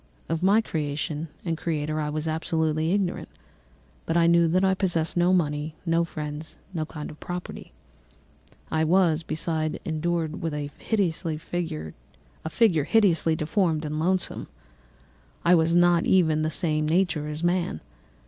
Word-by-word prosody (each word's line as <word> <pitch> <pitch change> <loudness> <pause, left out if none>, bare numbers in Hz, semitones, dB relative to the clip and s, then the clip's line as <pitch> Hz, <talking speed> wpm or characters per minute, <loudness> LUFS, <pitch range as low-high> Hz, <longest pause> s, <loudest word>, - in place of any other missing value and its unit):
Of 165 0 -1
my 200 +4 +5
creation 150 -3 -3 0.2
and 165 -2 0
creator 155 -2 -2
I 150 - -2
was 155 +1 -3
absolutely 160 0 0
ignorant, 195 -2 -1 0.8
but 165 - +1
I 170 - +4
knew 170 0 +5
that 185 +4 +2
I 190 0 +4
possessed 175 -4 -1
no 175 +1 +3
money, 155 -3 0
no 165 0 +2
friends, 150 -1 -6 0.2
no 155 -3 -2
kind 150 -2 -7
of 150 - -14
property. 180 0 -7 1.0
I 160 0 +2
was, 165 -1 +3
besides, 155 -1 -2
endued 160 0 -2
with 165 -2 -2
a 145 -1 -3
figure 165 - -2 0.9
hideously 170 -4 +3
deformed 160 -1 0
and 150 +1 -3
loathsome; 185 +3 0 1.0
I 175 - +6
was 165 0 +3
not 175 -1 +4
even 160 -5 +4
of - - 0
the - - +1
same 155 -2 0
nature 165 -2 +1
as 150 +2 -5
man. 175 - 0
160 Hz, 145 wpm, -26 LUFS, 155-175 Hz, 1.0 s, I